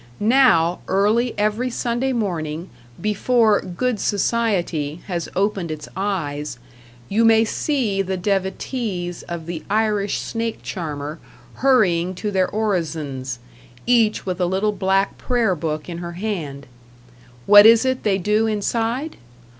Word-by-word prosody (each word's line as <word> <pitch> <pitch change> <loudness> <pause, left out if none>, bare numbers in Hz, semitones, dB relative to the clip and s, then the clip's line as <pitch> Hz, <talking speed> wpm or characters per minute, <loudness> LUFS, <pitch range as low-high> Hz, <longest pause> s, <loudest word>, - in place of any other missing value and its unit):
Now, 210 -8 +4
early 215 +5 +2
every 215 +4 0
Sunday 240 +2 -1
morning, 170 -8 -3 0.3
before 215 +1 +2
"Good 215 +6 -2
Society" 180 -9 0
has 175 -3 -3
opened 195 -2 0
its 155 -2 -6
eyes, 150 -9 -3 0.5
you 220 +3 +2
may 225 0 +5
see 225 -5 0
the 190 0 -2
devotees 190 -1 -2
of 170 -2 -7
the 170 -2 -5
Irish 210 -1 +1
snake 230 -1 -4
charmer 150 -3 -5 0.3
hurrying 185 -9 +2
to 210 +3 -3
their 190 -2 +1
orisons, 155 - -2 0.5
each 230 -3 +2
with 185 -1 -3
a 180 - +2
little 195 +4 +1
black 195 -1 0
prayer 235 -6 +1
book 155 -2 -3
in 170 -1 -6
her 175 0 -6
hand. 170 -8 -4 0.8
What 205 +1 +9
is 230 +2 +6
it 260 0 0
they 200 -3 +1
do 210 +4 +1
inside? 230 +7 -1
200 Hz, 130 wpm, -21 LUFS, 170-225 Hz, 0.8 s, What